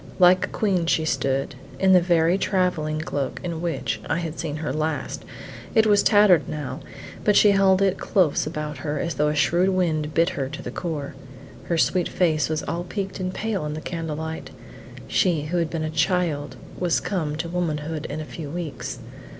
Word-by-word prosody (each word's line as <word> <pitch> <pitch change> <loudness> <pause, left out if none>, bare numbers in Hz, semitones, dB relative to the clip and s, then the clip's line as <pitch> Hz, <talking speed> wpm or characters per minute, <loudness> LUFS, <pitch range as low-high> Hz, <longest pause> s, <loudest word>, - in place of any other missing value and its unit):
Like 185 0 +6
a - - -12
queen 185 -6 0
she 160 -1 +2
stood, 135 -2 0 0.2
in 190 +5 +4
the 180 - +7
very 170 0 +3
travelling 165 -6 0
cloak 140 -4 -3
in 170 -2 -4
which 170 -1 -2
I 150 - +1
had 165 -2 -4
seen 155 -3 -3
her 155 0 -3
last; 155 +1 -2 0.5
it 220 -1 +6
was 205 -1 +5
tattered 205 -6 +5
now, 135 -4 -4 0.4
but 210 - +3
she 205 - +7
held 195 -1 +4
it 195 -1 +1
close 175 -6 +2
about 150 -1 -4
her 150 -1 -3
as 170 +2 -2
though 150 - +1
a 150 - 0
shrewd 175 +5 +3
wind 160 -5 0
bit 165 +2 +4
her 140 -8 -3
to 145 - -7
the - - -5
core. 155 -5 -4 0.5
Her 170 - 0
sweet 180 +1 +2
face 155 -5 +1
was 155 -1 -1
all 170 +1 -3
peeked 195 +1 -4
and 185 0 -2
pale 210 -2 -2
in 150 0 -3
the - - -4
candle 165 -2 -4
light: 160 +1 -5 0.6
she 170 -6 +2
who 165 +4 -2
had 165 -2 +1
been 165 -1 -3
a 155 - -2
child 160 -3 0 0.2
was 175 -2 +2
come 160 -7 -2
to 160 +2 -3
womanhood 160 -3 -2
in 150 - -5
a 155 - -5
few 150 -1 -7
weeks. 160 -3 -5
165 Hz, 200 wpm, -24 LUFS, 150-180 Hz, 0.6 s, the